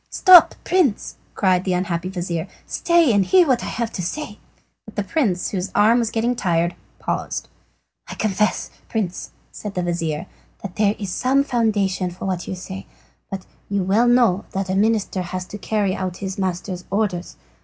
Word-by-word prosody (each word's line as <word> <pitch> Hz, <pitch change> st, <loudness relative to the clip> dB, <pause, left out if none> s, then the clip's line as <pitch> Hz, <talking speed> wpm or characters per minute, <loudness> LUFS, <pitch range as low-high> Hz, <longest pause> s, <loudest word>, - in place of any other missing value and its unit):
"Stop, 370 Hz, -3 st, +7 dB
Prince," 345 Hz, -, +1 dB, 0.2 s
cried 185 Hz, -2 st, +2 dB
the 185 Hz, -, 0 dB
unhappy 180 Hz, -1 st, -1 dB
vizir, 175 Hz, -2 st, -3 dB, 0.2 s
"stay 340 Hz, -7 st, +3 dB
and 200 Hz, -1 st, +4 dB
hear 360 Hz, -, +5 dB
what 255 Hz, -3 st, +2 dB
I -, -, -4 dB
have 230 Hz, -1 st, -2 dB
to 185 Hz, -, -4 dB
say." 215 Hz, -, -5 dB, 0.6 s
The 205 Hz, -, 0 dB
prince, 200 Hz, -, 0 dB
whose 190 Hz, -1 st, -2 dB
arm 220 Hz, +4 st, +5 dB
was 230 Hz, -2 st, 0 dB
getting 235 Hz, +2 st, 0 dB
tired, 170 Hz, -4 st, +1 dB, 0.2 s
paused. -, -, -3 dB, 0.6 s
"I -, -, -7 dB
confess, 210 Hz, 0 st, 0 dB, 0.2 s
Prince," 195 Hz, -5 st, -3 dB, 0.2 s
said 210 Hz, -2 st, -7 dB
the 180 Hz, -, -1 dB
vizir, 170 Hz, -2 st, -2 dB, 0.4 s
"that 200 Hz, -3 st, -7 dB
there 210 Hz, -1 st, +3 dB
is 200 Hz, -3 st, -4 dB
some 270 Hz, +2 st, +2 dB
foundation 205 Hz, -8 st, 0 dB
for 175 Hz, +2 st, -8 dB
what 185 Hz, -2 st, -2 dB
you -, -, -3 dB
say. 190 Hz, +1 st, -8 dB, 0.4 s
But 195 Hz, -2 st, -6 dB, 0.2 s
you 200 Hz, -1 st, 0 dB
know 210 Hz, +6 st, +3 dB
well 235 Hz, -6 st, +3 dB
that 190 Hz, -1 st, -2 dB
a -, -, 0 dB
minister 210 Hz, -2 st, +1 dB
has 180 Hz, +1 st, -4 dB
to 210 Hz, -, -9 dB
carry 200 Hz, -1 st, 0 dB
out 185 Hz, -1 st, -3 dB
his 190 Hz, 0 st, -5 dB
master's 185 Hz, 0 st, -3 dB
orders. 195 Hz, -3 st, -2 dB
195 Hz, 175 wpm, -21 LUFS, 180-225 Hz, 0.6 s, Stop